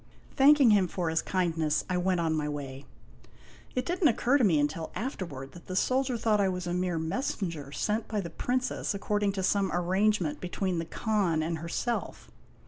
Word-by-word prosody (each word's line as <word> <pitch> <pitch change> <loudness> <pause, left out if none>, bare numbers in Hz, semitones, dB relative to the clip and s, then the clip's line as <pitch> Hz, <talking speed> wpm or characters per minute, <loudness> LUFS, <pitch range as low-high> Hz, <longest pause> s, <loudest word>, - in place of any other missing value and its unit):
Thanking 275 -3 +6
him 200 -3 +4
for 170 -1 -2
his 160 - +1
kindness, 165 -5 0
I 180 - -1
went 180 0 +1
on 165 -1 +1
my 150 -1 -1
way. 140 -2 -6 0.9
It 255 - 0
did 355 +2 -2
n't 315 - +6
occur 255 +4 +2
to - - +3
me 180 -8 +4
until 155 +2 -1
afterward 170 - -5
that 175 - -14
the 185 - -4
soldier 255 +4 +1
thought 220 -2 +2
I 195 - +2
was 180 -1 -3
a 175 - -2
mere 180 -1 0
messenger 165 - -3
sent 215 +8 -1
by 215 - -2
the 170 -4 -5
Princess 250 0 -1
according 205 0 0
to 190 -1 -3
some 195 0 +2
arrangement 185 -1 +1
be 180 - -4
tween 185 -2 -1
the 165 - -3
Khan 185 -4 0
and 165 0 -2
herself. 170 +8 -3
185 Hz, 195 wpm, -29 LUFS, 165-215 Hz, 0.9 s, Thanking